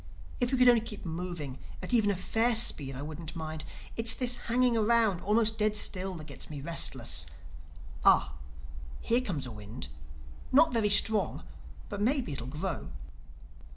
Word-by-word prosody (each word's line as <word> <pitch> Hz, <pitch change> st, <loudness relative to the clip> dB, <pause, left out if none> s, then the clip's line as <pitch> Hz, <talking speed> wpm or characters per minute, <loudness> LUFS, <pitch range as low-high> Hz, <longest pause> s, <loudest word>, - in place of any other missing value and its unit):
If 245 Hz, +1 st, 0 dB
we 265 Hz, -, +1 dB
could 250 Hz, 0 st, +5 dB
only 240 Hz, -2 st, +6 dB
keep 215 Hz, -3 st, -7 dB
moving 165 Hz, -5 st, -5 dB, 0.2 s
at -, -, -5 dB
even 220 Hz, -4 st, +3 dB
a 200 Hz, -, +1 dB
fair 225 Hz, +6 st, +1 dB
speed, 145 Hz, -, +2 dB
I 135 Hz, -, -6 dB
wouldn't 160 Hz, +2 st, -7 dB
mind. 155 Hz, -1 st, -5 dB, 0.3 s
It's 230 Hz, 0 st, +3 dB
this 250 Hz, -1 st, +1 dB
hanging 245 Hz, 0 st, +3 dB
around, 220 Hz, -4 st, +2 dB
almost 220 Hz, +2 st, +1 dB
dead 210 Hz, 0 st, +1 dB
still, 190 Hz, -2 st, -1 dB
that 155 Hz, -2 st, -9 dB
gets -, -, -9 dB
me 150 Hz, -2 st, -7 dB
restless—Ah, 80 Hz, -, -1 dB, 0.7 s
here 235 Hz, +2 st, +1 dB
comes 175 Hz, -, -4 dB
a 125 Hz, -, -7 dB
wind—Not 125 Hz, -, -2 dB
very 220 Hz, -3 st, +2 dB
strong—but 205 Hz, 0 st, +1 dB
maybe 245 Hz, -, 0 dB
it'll 125 Hz, -3 st, -6 dB
grow." 160 Hz, +6 st, -4 dB
190 Hz, 150 wpm, -30 LUFS, 145-230 Hz, 0.7 s, only